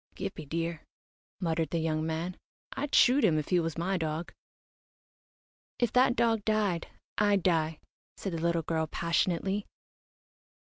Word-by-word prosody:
"Gippie 150 -3 -6
dear," 165 0 -2 0.6
muttered 165 -3 0
the 170 - -1
young 160 -1 0
man. 165 +3 -2 0.4
"I'd 285 +1 -1
shoot 265 +3 +6
him 155 - +4
if 150 - -2
he 180 - +4
was 165 -1 -2
my 185 +3 0
dog." 160 +1 -3 1.4
"If 240 -3 +1
that 250 0 +4
dog 225 -4 +2
died, 205 -6 +1 0.3
I'd 205 -3 +3
die," 160 -3 +2 0.4
said 195 - -4
the 165 - -3
little 170 -1 +1
girl, 160 0 -1
passionately. 175 +5 0
170 Hz, 140 wpm, -30 LUFS, 160-200 Hz, 1.4 s, shoot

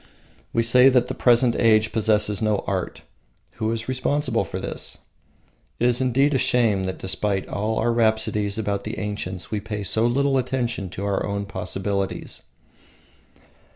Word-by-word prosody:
We 115 - +1
say 125 +3 +6
that 125 -2 +2
the - - -2
present 120 0 +3
age 110 -2 +3
possesses 105 -2 +1
no 105 -2 +1
art: 95 -2 -3 0.5
who 110 0 -1
is 115 0 -4
responsible 135 +3 0
for - - -6
this? - - -5 0.8
It 120 - +1
is 125 +1 +3
indeed 135 +3 +2
a 135 - +2
shame 110 -8 +2
that 95 - -3
despite 95 0 -1
all 110 +2 -2
our 120 - +1
rhapsodies 110 -2 +1
about 100 -2 -2
the - - -5
ancients 95 -5 -5
we 105 - -1
pay 105 0 -5
so 110 +4 +1
little 135 +2 +2
attention 120 -6 -2
to 95 +3 -5
our 100 -1 0
own 100 0 -3
possibilities. 95 +1 -3
110 Hz, 155 wpm, -23 LUFS, 100-120 Hz, 0.8 s, say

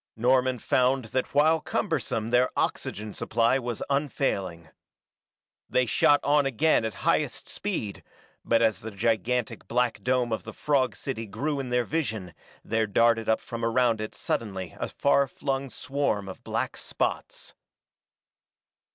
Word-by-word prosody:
Norman 125 +2 +2
found 130 +2 +2
that 130 - -1
while 155 +3 +4
cumbersome 115 - -1
their 125 +1 +4
oxygen 105 0 -2
supply 115 +3 +1
was 120 -3 -4
unfailing. 100 - -1 1.0
They 125 - +2
shot 145 +4 +4
on 145 0 +3
again 140 +1 +2
at 110 - -3
highest - - +1
speed, 100 -2 -4 0.4
but 115 0 +3
as 110 -4 +2
the 110 - -6
gigantic 115 +3 -1
black 125 -1 0
dome 125 -2 +1
of 110 - -3
the 110 - -8
frog 135 -4 +1
city 115 -5 -5
grew 140 +8 -2
in 130 -2 -4
their 125 0 +1
vision 110 - -3 0.3
there 110 0 +1
darted 115 +2 +3
up 110 - +2
from 115 0 -6
around 115 -1 +2
it 110 - -5
suddenly 95 -6 -3
a - - -2
far 140 0 +2
flung 135 0 -3
swarm 130 -8 -1
of 95 - -9
black - - -2
spots. - - -3
120 Hz, 145 wpm, -27 LUFS, 110-135 Hz, 1.0 s, while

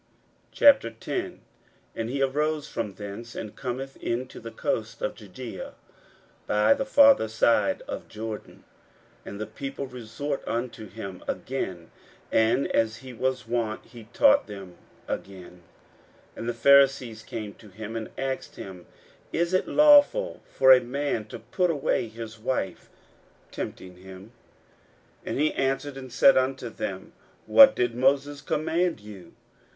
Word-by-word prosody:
41:010:001 350 +6 +3 0.6
And 115 0 -3
he 135 +2 0
arose 150 +2 0
from 100 -2 -4
thence, 105 +4 -8
and 110 - -6
cometh 135 +1 -5
into 125 +2 -4
the 115 - -8
coasts 280 - -3
of - - -2
Judaea - - -9 0.7
by - - +4
the 270 -1 -3
farther 280 - +6
side 115 - +2
of - - -6
Jordan: 110 0 -7 0.6
and 100 - -7
the 110 - -3
people 135 +5 -6
resort 125 +3 -5
unto 115 -2 -3
him 100 -3 -8
again; 95 -10 -4 0.4
and, 110 +5 +3
as 110 0 +1
he 130 - -8
was 130 +1 -2
wont, 115 -2 -2
he 115 -3 -13
taught 110 -1 +4
them 100 -4 -9 0.3
again. 90 -2 -7 0.7
41:010:002 - - -22
And 115 - -4
the - - -1
Pharisees 135 -3 +4
came 110 -2 -6
to 105 - -16
him, 110 +3 -8
and 110 -1 -4
asked 135 0 -4
him, 95 -2 -10 0.4
Is 170 +2 0
it 185 - +2
lawful 300 +12 +5
for 130 0 +5
a 130 -1 +8
man 125 -2 -2
to 105 - -8
put 175 - -1
away 145 -6 0
his 110 0 -9
wife? 110 -4 -3 0.6
tempting 90 -1 -7
him. 95 +3 -12 1.0
41:010:003 - - -3
And - - -2
he 155 +1 +2
answered 135 +1 -1
and 130 -2 -9
said 135 +2 +6
unto 130 -1 0
them, 95 -4 -6 0.3
What 275 -1 +8
did 120 -1 0
Moses 140 +3 +1
command 160 +2 0
you? 105 -3 -12
125 Hz, 145 wpm, -26 LUFS, 110-140 Hz, 1.0 s, a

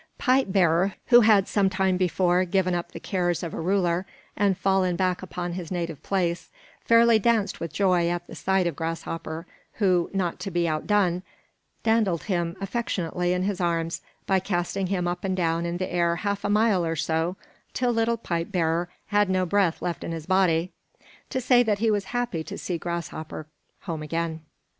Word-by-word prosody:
Pipe 255 -5 +2
bearer, 185 0 +3
who 240 -1 +8
had 210 -3 +5
some 200 -2 +2
time 190 -1 +1
before 180 0 +2
given 185 0 +1
up 175 0 -3
the - - -8
cares 175 -4 -1
of 170 - -4
a - - -4
ruler 180 0 +1 0.3
and 200 -2 +2
fallen 190 -2 +2
back 185 0 0
upon 175 -2 -5
his 175 -2 -5
native 170 -5 -3
place, 175 -2 -1 0.3
fairly 230 -1 +5
danced 220 -2 +1
with 165 -2 -4
joy 180 -1 +2
at 175 0 -2
the - - -12
sight 190 -1 +1
of 170 -4 -1
Grasshopper, 165 0 -4 0.3
who, 185 -5 +2
not 185 -3 -2
to 195 - -4
be 175 -2 0
outdone, 180 +3 +1 0.6
dandled 220 -7 +2
him 175 -3 -1
affectionately 185 -4 -2
in 180 0 0
his 195 -1 -1
arms 165 -1 -1 0.2
by 190 -1 +3
casting 185 +1 -2
him 180 -2 -1
up 175 0 -3
and 190 -1 -1
down 170 -1 0
in 170 0 -2
the 185 0 -4
air 170 -1 +2
half 200 +3 -2
a 205 - -1
mile 210 -3 +3
or 165 0 -1
so, 160 +3 -1 0.4
till 250 -1 +1
little 230 0 +1
Pipe 170 -4 -3
bearer 170 -1 0 0.2
had 205 -1 +3
no 185 0 +2
breath 185 -2 +1
left 175 -1 -3
in - - -4
his 160 -2 -6
body 180 -2 +2 0.6
to 260 - -1
say 245 -1 +4
that 215 -4 +1
he 220 +1 +2
was 205 -2 0
happy 240 -8 -2
to - - -7
see 175 -2 -3
Grasshopper 165 -2 -5 0.4
home 165 -5 -5
again. 165 +1 -3
180 Hz, 185 wpm, -25 LUFS, 170-200 Hz, 0.6 s, who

